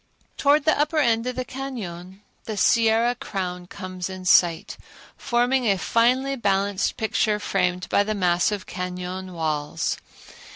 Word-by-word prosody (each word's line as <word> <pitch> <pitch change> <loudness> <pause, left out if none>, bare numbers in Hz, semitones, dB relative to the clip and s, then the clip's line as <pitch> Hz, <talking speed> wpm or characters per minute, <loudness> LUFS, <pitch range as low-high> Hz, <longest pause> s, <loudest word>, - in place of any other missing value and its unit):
Towards 290 +1 +3
the 315 - +3
upper 300 +2 +1
end 235 -4 +2
of 250 - -3
the 255 - -3
cañon 200 -9 -7 0.2
the 215 -2 -5
Sierra 230 +3 +3
crown 180 -6 -5
comes 185 -1 -6
in 185 -1 -8
sight, 175 -2 +3 0.4
forming 245 0 +1
a 195 - +3
finely 255 +7 +2
balanced 200 -4 0
picture 220 -1 +1
framed 180 -3 -1
by - - +3
the 215 +1 -1
massive 185 +2 +1
cañon 180 +1 -5
walls. 155 -3 -2
200 Hz, 135 wpm, -24 LUFS, 180-240 Hz, 0.4 s, Towards